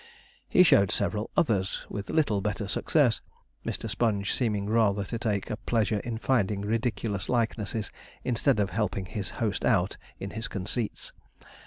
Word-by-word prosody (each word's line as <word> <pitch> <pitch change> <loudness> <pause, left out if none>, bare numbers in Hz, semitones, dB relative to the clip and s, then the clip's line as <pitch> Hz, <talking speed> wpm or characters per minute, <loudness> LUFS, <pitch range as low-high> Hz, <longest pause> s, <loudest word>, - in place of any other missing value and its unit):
He 180 - +7
showed 100 - +5
several 105 +3 -1
others, 100 - +1
with 100 -1 -6
little 125 -11 +2
better 105 0 -2
success, 125 +3 +2 0.4
Mr. - - -3
Sponge 105 -2 0
seeming 105 -5 0
rather 105 -2 +2
to 115 +4 -4
take 105 -3 -1
a 110 - -2
pleasure 110 -2 +1
in 115 +1 -4
finding 105 -5 +1
ridiculous 110 -2 -1
likenesses, 110 -3 -1 0.3
instead 125 0 +2
of 100 -3 +1
helping 100 -1 -1
his 100 +1 -4
host 110 -3 -1
out 95 -6 +2 0.2
in 100 - -5
his 110 +1 -4
conceits. 100 +4 -3
105 Hz, 150 wpm, -28 LUFS, 100-115 Hz, 0.4 s, He